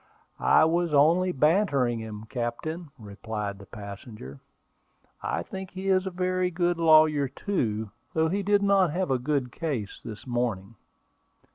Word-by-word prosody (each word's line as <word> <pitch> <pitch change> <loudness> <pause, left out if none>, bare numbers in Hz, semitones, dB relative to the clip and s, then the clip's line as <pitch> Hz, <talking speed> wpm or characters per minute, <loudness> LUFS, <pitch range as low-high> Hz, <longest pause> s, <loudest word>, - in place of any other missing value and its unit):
"I - - +7
was 170 -1 +1
only 170 +6 +4
bantering 140 - +2
him, 110 -1 -7
captain," 135 +8 -4
replied 105 -2 -6
the 100 - -13
passenger. 100 - -9 0.8
"I - - -2
think 190 -1 -7
he 190 +1 -4
is 190 0 +2
a - - 0
very 185 0 0
good 175 0 0
lawyer 155 -3 +5
too, 110 - -2 0.2
though 160 0 +3
he 195 +5 -1
did 205 +1 +2
not 195 -3 +4
have 180 -4 -1
a 130 - +2
good 135 -1 -1
case 130 -12 -4
this 110 -2 -8
morning." 120 -5 -2
150 Hz, 145 wpm, -27 LUFS, 110-180 Hz, 0.8 s, I